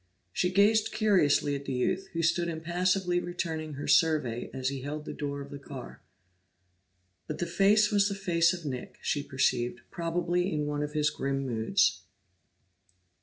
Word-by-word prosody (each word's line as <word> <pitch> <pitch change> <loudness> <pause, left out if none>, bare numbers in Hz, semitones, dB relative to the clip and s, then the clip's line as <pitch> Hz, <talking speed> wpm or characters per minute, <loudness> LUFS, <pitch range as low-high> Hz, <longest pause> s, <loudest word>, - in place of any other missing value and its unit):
She 180 - +1
gazed 210 +3 +4
curiously 180 -9 +3
at 140 0 -6
the 135 - -3
youth, 190 +10 0
who 165 0 -1
stood 170 +1 +2
impassively 175 +2 0
returning 165 -3 -4
her 145 - -5
survey 150 -8 +2
as 130 0 -2
he 135 -1 -5
held 150 +3 -5
the - - -5
door 140 -1 -4
of 140 - -9
the 140 - -7
car. 140 -2 -9 1.3
But - - -4
the 175 - -1
face 205 +5 +4
was 205 -1 +3
the 200 - -3
face 170 -4 +2
of 175 -3 -6
Nick, 130 -3 -5
she 145 - 0
perceived, 130 -3 0
probably 175 +2 -1
in 150 -2 -1
one 145 0 -2
of 150 0 -3
his 150 -1 +2
grim 135 0 -2
moods. 120 - +1
160 Hz, 170 wpm, -29 LUFS, 140-180 Hz, 1.3 s, gazed